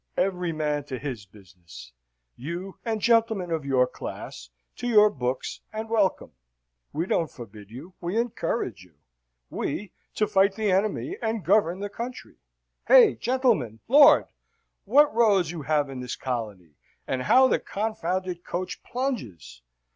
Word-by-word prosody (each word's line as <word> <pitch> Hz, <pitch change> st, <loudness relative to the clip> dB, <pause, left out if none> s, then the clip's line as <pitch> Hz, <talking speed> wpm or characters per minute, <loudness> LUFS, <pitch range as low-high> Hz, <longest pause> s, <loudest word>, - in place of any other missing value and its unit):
Every 180 Hz, -2 st, 0 dB
man 150 Hz, -2 st, -1 dB
to 130 Hz, -3 st, -5 dB
his 125 Hz, -7 st, -6 dB
business. 85 Hz, -, -15 dB, 0.4 s
You, 170 Hz, +8 st, -7 dB
and 225 Hz, -2 st, -2 dB
gentlemen 220 Hz, -5 st, +2 dB
of 160 Hz, -2 st, -1 dB
your 130 Hz, -2 st, +3 dB
class, -, -, -8 dB, 0.3 s
to 245 Hz, -, -4 dB
your 210 Hz, -3 st, +6 dB
books, 125 Hz, -5 st, -4 dB
and 220 Hz, +1 st, -6 dB
welcome. 205 Hz, -4 st, +1 dB, 0.6 s
We 165 Hz, +3 st, -2 dB
don't 165 Hz, -4 st, 0 dB
forbid 105 Hz, -5 st, -12 dB
you; 140 Hz, +11 st, -11 dB
we 175 Hz, +5 st, -2 dB
encourage 230 Hz, -, -2 dB
you. 90 Hz, -4 st, -22 dB, 0.6 s
We, 200 Hz, +7 st, -4 dB, 0.2 s
to 215 Hz, -, +2 dB
fight 195 Hz, -1 st, +2 dB
the 215 Hz, -3 st, 0 dB
enemy 215 Hz, -, -1 dB
and 220 Hz, -5 st, -2 dB
govern 190 Hz, -1 st, +2 dB
the 205 Hz, -, -2 dB
country. 240 Hz, +4 st, -8 dB, 0.5 s
Hey, -, -, +7 dB
gentlemen? 230 Hz, -, 0 dB
Lord! 285 Hz, +4 st, +7 dB, 0.6 s
what 285 Hz, +7 st, +5 dB
roads 205 Hz, -8 st, +3 dB
you 170 Hz, -3 st, -6 dB
have 150 Hz, 0 st, +1 dB
in 135 Hz, -2 st, -7 dB
this 125 Hz, 0 st, -5 dB
colony, 105 Hz, -, -5 dB, 0.3 s
and 130 Hz, -1 st, -2 dB
how 255 Hz, -, +5 dB
this -, -, +1 dB
confounded 185 Hz, -4 st, -3 dB
coach 180 Hz, +1 st, -5 dB
plunges! 175 Hz, -, -5 dB
180 Hz, 145 wpm, -26 LUFS, -, 0.6 s, Hey